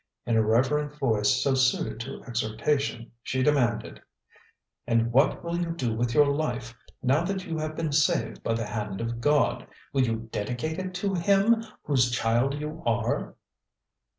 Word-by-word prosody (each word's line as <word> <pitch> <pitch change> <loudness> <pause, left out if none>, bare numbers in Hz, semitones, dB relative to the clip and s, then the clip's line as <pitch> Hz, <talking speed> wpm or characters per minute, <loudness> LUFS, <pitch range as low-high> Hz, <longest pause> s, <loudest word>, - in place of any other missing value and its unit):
In 120 - 0
her 110 - +4
reverent 145 +7 +1
voice, 110 -7 +2
so 140 - +2
suited 130 -3 +1
to 120 - -7
exhortation, 115 +2 -1
she 130 +2 -1
demanded: 130 -6 +1 0.9
"And 115 0 +2
what 135 +5 +3
will 170 0 -2
you 170 -1 -1
do 125 -8 -1
with 120 +1 -1
your 150 -1 +7
life, 135 -5 -2 0.3
now 135 +6 +3
that 190 0 -3
you 165 -2 -3
have 155 0 -3
been 160 -2 -2
saved 140 +1 +1
by 115 - 0
the 115 -1 -2
hand 105 -2 -4
of 115 0 -3
God? 145 +3 +2 0.3
Will 135 - +3
you 115 -2 -1
dedicate 125 - -3
it 185 0 -5
to 195 +1 -1
Him, 200 +6 +3 0.2
whose 130 -4 +2
child 120 +3 +1
you 150 +2 -6
are?" 115 0 -1
130 Hz, 165 wpm, -27 LUFS, 115-155 Hz, 0.9 s, your